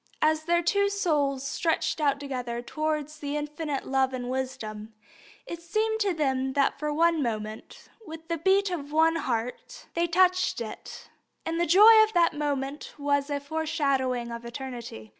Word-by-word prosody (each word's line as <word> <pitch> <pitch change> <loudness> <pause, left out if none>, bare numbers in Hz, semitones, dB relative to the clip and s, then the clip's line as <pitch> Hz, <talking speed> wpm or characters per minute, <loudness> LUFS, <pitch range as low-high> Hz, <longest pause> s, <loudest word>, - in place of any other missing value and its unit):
As 310 0 +2
their 345 +1 +2
two 400 +3 +2
souls 295 -9 0
stretched 325 +2 -1
out 280 -2 +2
together 250 -4 -4
towards 305 +2 -3
the 290 0 -3
infinite 295 -1 -4
Love 265 0 +1
and 250 -1 -4
Wisdom, 225 -5 -5 0.5
it 340 -8 -7
seemed 435 +6 -1
to 410 -2 +1
them 265 -5 -1
that 280 0 +1
for 300 0 -2
one 330 +1 +2
moment, 215 -3 -5 0.2
with 320 -4 -9
one 335 -1 -2
beat 390 0 +3
of 290 -5 -4
the 325 +2 +3
heart, 250 - -4
they 340 +1 +1
touched 365 +2 +2
It, 230 -2 -8 0.3
and 330 +1 -1
the 345 - +1
joy 430 +6 +8
of 435 0 -2
that 345 -1 +3
moment 285 -1 -3
was 285 0 0
a 285 -1 -1
foreshadowing 275 -5 -1
of 235 0 -6
eternity. 235 - -7
295 Hz, 160 wpm, -27 LUFS, 265-335 Hz, 0.5 s, joy